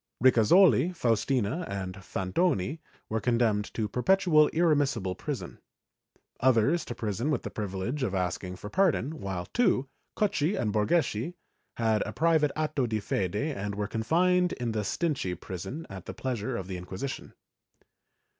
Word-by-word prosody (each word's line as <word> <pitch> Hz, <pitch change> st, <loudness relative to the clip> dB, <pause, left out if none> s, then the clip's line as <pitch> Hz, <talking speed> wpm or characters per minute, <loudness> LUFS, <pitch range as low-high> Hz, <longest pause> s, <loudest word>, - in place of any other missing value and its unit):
Ricasoli, 130 Hz, -, +5 dB
Faustina 125 Hz, -, 0 dB
and 95 Hz, -1 st, -4 dB
Fantoni 95 Hz, -, -1 dB, 0.3 s
were 110 Hz, 0 st, -2 dB
condemned 115 Hz, -4 st, +1 dB
to 110 Hz, -2 st, 0 dB
perpetual 155 Hz, -, +4 dB
irremissible 145 Hz, -, +1 dB
prison, -, -, -5 dB, 0.8 s
others 130 Hz, +6 st, +3 dB
to 120 Hz, -, -6 dB
prison 110 Hz, +5 st, -2 dB
with 145 Hz, -6 st, 0 dB
the -, -, -5 dB
privilege 105 Hz, +7 st, -3 dB
of 105 Hz, -7 st, -1 dB
asking 90 Hz, 0 st, -2 dB
for 105 Hz, -, -8 dB
pardon, 160 Hz, -, +1 dB
while 95 Hz, -3 st, -4 dB
two, 135 Hz, -, +1 dB, 0.3 s
Cocchi 195 Hz, -3 st, +1 dB
and 105 Hz, -3 st, 0 dB
Borgeschi, 130 Hz, +5 st, +1 dB, 0.4 s
had 110 Hz, -2 st, +2 dB
a 110 Hz, -, -6 dB
private 160 Hz, -3 st, +3 dB
atto 150 Hz, -4 st, 0 dB
di 110 Hz, -1 st, -1 dB
fede 95 Hz, -2 st, -2 dB
and 105 Hz, -6 st, -2 dB
were 105 Hz, 0 st, -1 dB
confined 175 Hz, -, +2 dB
in 120 Hz, -2 st, -3 dB
the 110 Hz, -1 st, -1 dB
Stinche 100 Hz, -, -1 dB
prison 95 Hz, -, -6 dB
at 95 Hz, -2 st, -9 dB
the -, -, -6 dB
pleasure 125 Hz, -2 st, -3 dB
of 95 Hz, -, -5 dB
the 95 Hz, -1 st, -4 dB
Inquisition. 95 Hz, +9 st, -6 dB
120 Hz, 145 wpm, -28 LUFS, 100-155 Hz, 0.8 s, Ricasoli